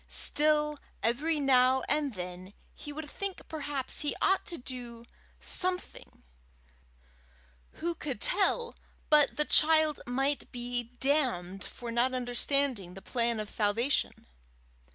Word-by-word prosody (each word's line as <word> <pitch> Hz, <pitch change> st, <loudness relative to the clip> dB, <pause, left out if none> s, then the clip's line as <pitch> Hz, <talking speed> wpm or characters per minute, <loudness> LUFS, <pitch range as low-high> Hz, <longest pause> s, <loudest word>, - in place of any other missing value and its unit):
Still, 300 Hz, 0 st, +3 dB, 0.2 s
every 295 Hz, +8 st, +1 dB
now 260 Hz, -1 st, +4 dB
and 290 Hz, -5 st, -1 dB
then 180 Hz, +1 st, -8 dB, 0.2 s
he 295 Hz, -, -9 dB
would 300 Hz, +1 st, -7 dB
think 395 Hz, +5 st, -5 dB
perhaps 290 Hz, -4 st, 0 dB
he 295 Hz, -, 0 dB
ought 385 Hz, 0 st, +1 dB
to 340 Hz, -, -6 dB
do 245 Hz, -2 st, -8 dB, 0.3 s
something: 365 Hz, 0 st, -1 dB, 1.5 s
who 340 Hz, +1 st, -3 dB
could 285 Hz, -9 st, -5 dB
tell 470 Hz, -, +1 dB, 0.4 s
but 295 Hz, -2 st, +5 dB
the 300 Hz, -, +2 dB
child 310 Hz, -1 st, +4 dB
might 270 Hz, +3 st, -1 dB
be 245 Hz, -1 st, -3 dB
damned 235 Hz, -10 st, 0 dB
for 240 Hz, -1 st, -8 dB
not 245 Hz, +2 st, +1 dB
understanding 245 Hz, -5 st, 0 dB
the 195 Hz, -, -10 dB
plan 235 Hz, -2 st, -1 dB
of 210 Hz, -1 st, -5 dB
salvation? 225 Hz, +6 st, 0 dB
265 Hz, 120 wpm, -30 LUFS, 235-300 Hz, 1.5 s, but